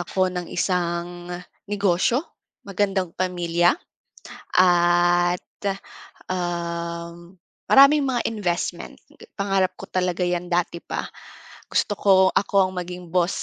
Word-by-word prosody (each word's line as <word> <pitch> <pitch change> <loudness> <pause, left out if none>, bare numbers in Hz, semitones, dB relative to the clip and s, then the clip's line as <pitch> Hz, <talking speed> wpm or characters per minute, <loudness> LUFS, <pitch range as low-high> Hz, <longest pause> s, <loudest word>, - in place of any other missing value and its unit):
ako 185 +1 0
ng 180 -1 -4
isang 175 -1 -2 0.4
negosyo, 205 - +1 0.4
magandang 195 -3 -1
pamilya 175 -1 +1 0.8
at, 175 0 +4 0.9
um, 170 -1 -4 0.3
maraming 280 +2 +6
mga 250 -3 0
investment. 190 -6 -3 0.4
Pangarap 195 -2 +1
ko - - -9
talaga 180 -1 -1
'yan 175 0 -1
dati 175 0 0
pa. - - -4 0.6
Gusto 205 - 0
ko, 200 - +4 0.2
ako 195 -1 +2
ang - - -12
maging 180 -1 -6
boss 180 +1 0
180 Hz, 105 wpm, -23 LUFS, 175-195 Hz, 0.9 s, maraming